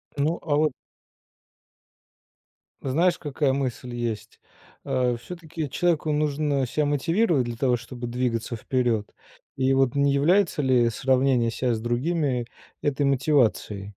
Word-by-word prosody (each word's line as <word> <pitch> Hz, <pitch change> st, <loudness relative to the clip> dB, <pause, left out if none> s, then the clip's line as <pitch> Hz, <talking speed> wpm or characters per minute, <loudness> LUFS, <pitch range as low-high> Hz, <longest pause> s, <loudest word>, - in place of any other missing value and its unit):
Ну, 150 Hz, +4 st, 0 dB
а 150 Hz, -3 st, 0 dB
вот 150 Hz, -3 st, +2 dB, 2.1 s
Знаешь, 165 Hz, +7 st, +2 dB
какая 145 Hz, -2 st, 0 dB
мысль 125 Hz, -2 st, -3 dB
есть? 115 Hz, -3 st, -4 dB, 0.5 s
А 125 Hz, -1 st, +1 dB
всё-таки 160 Hz, +1 st, -6 dB
человеку 160 Hz, 0 st, +1 dB
нужно 150 Hz, -2 st, 0 dB
ся 150 Hz, +5 st, 0 dB
мотивировать 160 Hz, -, +1 dB
для 120 Hz, -, -4 dB
того, 125 Hz, +1 st, +2 dB
чтобы 120 Hz, +1 st, -7 dB
двигаться 120 Hz, -1 st, -2 dB
вперёд. 115 Hz, -2 st, -1 dB, 0.4 s
И 135 Hz, 0 st, +2 dB
вот 135 Hz, 0 st, +2 dB
не 140 Hz, 0 st, +3 dB
является 170 Hz, +4 st, +3 dB
ли 125 Hz, -3 st, +3 dB
сравнение 130 Hz, -1 st, +2 dB
ся 120 Hz, +1 st, -1 dB
с 110 Hz, -, -2 dB
другими 125 Hz, +1 st, 0 dB, 0.4 s
этой 145 Hz, -1 st, +1 dB
мотивацией? 130 Hz, -8 st, +1 dB
135 Hz, 125 wpm, -25 LUFS, 120-150 Hz, 2.1 s, не